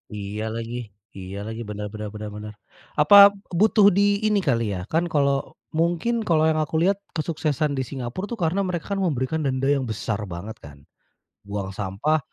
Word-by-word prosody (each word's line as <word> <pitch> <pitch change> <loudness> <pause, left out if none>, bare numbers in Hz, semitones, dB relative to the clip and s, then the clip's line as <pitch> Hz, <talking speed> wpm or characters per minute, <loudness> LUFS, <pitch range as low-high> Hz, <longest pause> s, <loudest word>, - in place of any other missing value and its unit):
Iya 105 +1 -5
lagi 115 +1 -5 0.4
iya 95 +1 -7
lagi. 115 +1 -5
Benar 105 0 -5
benar 105 0 -6
benar 105 0 -6
benar. 105 0 -7 0.5
Apa 150 +7 +6 0.4
butuh 215 0 +5
di 195 - +2 0.3
ini 210 -1 +3
kali 115 -5 +1
ya, 90 -2 -3
kan, 165 +2 +2
kalau 140 -3 +3 0.4
mungkin 175 +8 +1
kalau 160 -2 +3
yang 155 0 +2
aku 155 - -6
lihat 195 +2 +3 0.2
kesuksesan 155 -2 -1
di 130 - -1
Singapura 130 +5 -5
tuh 235 - -4
karena 175 +3 +1
mereka 180 +1 -3
memberikan 160 -5 -1
denda 135 -1 0
yang 140 -1 +2
besar 110 -1 -3
banget 100 +6 -7
kan. 75 0 -11 0.7
Buang 100 -1 -4
sampah, 105 +11 0
140 Hz, 170 wpm, -24 LUFS, 105-165 Hz, 0.7 s, Apa